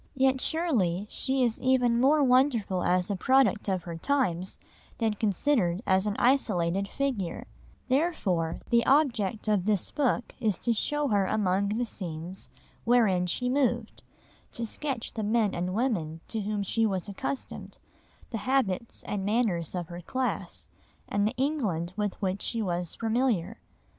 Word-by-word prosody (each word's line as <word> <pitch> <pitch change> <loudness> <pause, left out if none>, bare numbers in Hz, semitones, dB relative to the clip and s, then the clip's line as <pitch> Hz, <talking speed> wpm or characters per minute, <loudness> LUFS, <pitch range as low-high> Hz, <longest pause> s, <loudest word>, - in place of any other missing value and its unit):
Yet 265 0 +2
surely 220 - +1
she 265 -1 0
is 235 -2 0
even 250 -2 +3
more 290 +3 +5
wonderful 250 -8 +3
as 180 +2 +1
a - - 0
product 260 0 +3
of 185 -3 -1
her 170 -2 -6
times 190 -6 0 0.4
than 225 -2 +1
considered 205 -2 +1
as 190 +2 +2
an 205 - -1
isolated 200 -8 +2
figure; 235 -9 -2 0.4
therefore 240 - 0
the 235 0 +5
object 235 -8 +2
of 205 -4 +2
this 205 -4 0
book 255 -5 0
is 215 -6 +1
to 235 - 0
show 295 +6 0
her 200 -3 +2
among 200 -1 +1
the 230 +4 0
scenes 175 -3 -6 0.3
wherein 215 -7 +3
she 250 +8 0
moved, 245 -4 0 0.5
to 235 - -3
sketch 255 +1 -4
the 220 - -3
men 215 -1 +2
and 180 +2 -2
women 185 -10 -1
to 220 - -2
whom 205 0 -2
she 225 +4 0
was 190 -2 -2
accustomed, 265 +6 -5 0.5
the 225 - -2
habits 235 -4 -1
and 200 -2 -3
manners 200 -6 0
of 175 -2 -4
her 175 0 -7
class, 255 +8 -3 0.4
and 205 +1 +1
the 225 - -3
England 215 - -1
with 210 -2 -2
which 190 +1 -1
she 230 -2 -1
was 175 -3 -2
familiar. 225 -4 0
215 Hz, 155 wpm, -28 LUFS, 185-255 Hz, 0.5 s, more